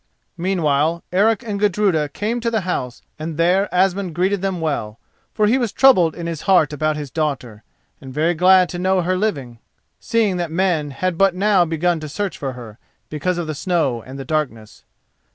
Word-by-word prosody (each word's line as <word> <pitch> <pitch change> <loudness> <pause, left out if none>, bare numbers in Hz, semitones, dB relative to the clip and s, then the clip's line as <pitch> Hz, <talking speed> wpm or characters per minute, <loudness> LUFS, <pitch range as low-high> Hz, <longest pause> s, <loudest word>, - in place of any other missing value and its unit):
Meanwhile 165 -3 0
Eric 210 +4 +2
and 210 -3 -4
Gudruda 195 -7 +1
came 220 +9 -3
to 230 0 -1
the 220 -2 0
house 130 -9 -4 0.2
and 155 0 -5
there 180 +4 +2
Asmund 185 -1 0
greeted 190 +2 0
them 190 -2 -2
well, 115 -9 -3 0.3
for 215 - +1
he 240 +5 +3
was 235 -5 -1
troubled 185 -12 +4
in 170 - -6
his 165 -2 -4
heart 165 -6 +4
about 155 +1 -1
his 145 -3 -6
daughter, 130 -9 -3 0.4
and 135 - -9
very 155 +5 +1
glad 180 +2 +5
to 175 - -5
know 185 0 +2
her 185 +2 0
living, 140 - -3 0.4
seeing 220 -5 0
that 175 -2 -2
men 165 -3 0
had 175 +5 -3
but 195 -2 +4
now 195 -2 +3
begun 165 +1 0
to 155 -1 -7
search 200 +3 -3
for 135 -2 -4
her, 115 -4 -11 0.3
because 170 +4 -1
of 175 - -2
the 155 - -4
snow 155 -7 -1
and 130 +4 -10
the 135 - -7
darkness. 125 -8 -4
175 Hz, 190 wpm, -20 LUFS, 150-190 Hz, 0.4 s, glad